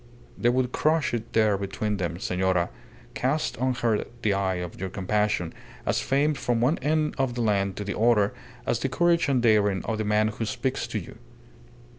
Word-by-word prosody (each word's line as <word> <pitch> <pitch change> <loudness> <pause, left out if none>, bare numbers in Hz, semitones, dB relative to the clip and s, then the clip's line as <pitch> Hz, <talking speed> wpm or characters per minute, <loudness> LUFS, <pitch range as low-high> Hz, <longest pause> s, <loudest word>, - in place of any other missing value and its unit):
They 120 - +2
would 125 0 +1
crush 155 0 +1
it 115 -1 -3
there 105 -3 +3
between 100 +1 -2
them. 85 -2 -2
Senora, 90 -2 0 0.4
cast 140 +5 0
on 130 0 +1
her 115 -4 +1 0.2
the 105 -2 +3
eye 95 -1 0
of 90 -1 -6
your 95 +1 -3
compassion, 100 -2 0 0.3
as - - +1
famed 145 +2 +1
from 120 -2 0
one 130 +8 +2
end 155 +2 +1
of 130 -3 0
the 120 - -1
land 100 -3 +1
to 105 - -4
the 100 -1 -4
other 110 -3 +3 0.3
as 115 - 0
the 135 - -1
courage 170 +2 +2
and 130 -3 +2
daring 105 -4 +3
of 110 -1 -2
the - - 0
man 105 +1 +2
who 110 +1 -4
speaks 130 +4 -2
to - - -3
you. - - -8
110 Hz, 195 wpm, -26 LUFS, 100-130 Hz, 0.4 s, there